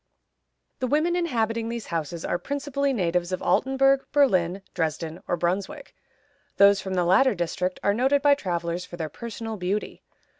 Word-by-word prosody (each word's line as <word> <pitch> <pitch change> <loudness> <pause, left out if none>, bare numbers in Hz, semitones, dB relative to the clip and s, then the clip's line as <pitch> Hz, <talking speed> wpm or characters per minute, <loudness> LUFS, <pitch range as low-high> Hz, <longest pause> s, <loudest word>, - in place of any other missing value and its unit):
The 255 - -1
women 310 +6 +1
inhabiting 230 -9 -1
these 235 -2 -5
houses 165 0 -4
are 175 - -1
principally 280 +4 -2
natives 180 -5 0
of 185 - -3
Altenburg, 270 +1 +3
Berlin, 195 -10 +2
Dresden, 160 0 -3
or 175 - 0
Brunswick; 180 +3 -3 0.6
those 200 0 +6
from 190 -1 -4
the 180 -1 +1
latter 210 +7 +4
district 180 +1 -2
are 200 - +3
noted 270 +5 +2
by 290 -1 +6
travelers 175 -7 -2
for 175 -1 -10
their 160 -2 -3
personal 225 +4 -6
beauty. 190 +3 -3
200 Hz, 155 wpm, -25 LUFS, 175-265 Hz, 0.6 s, those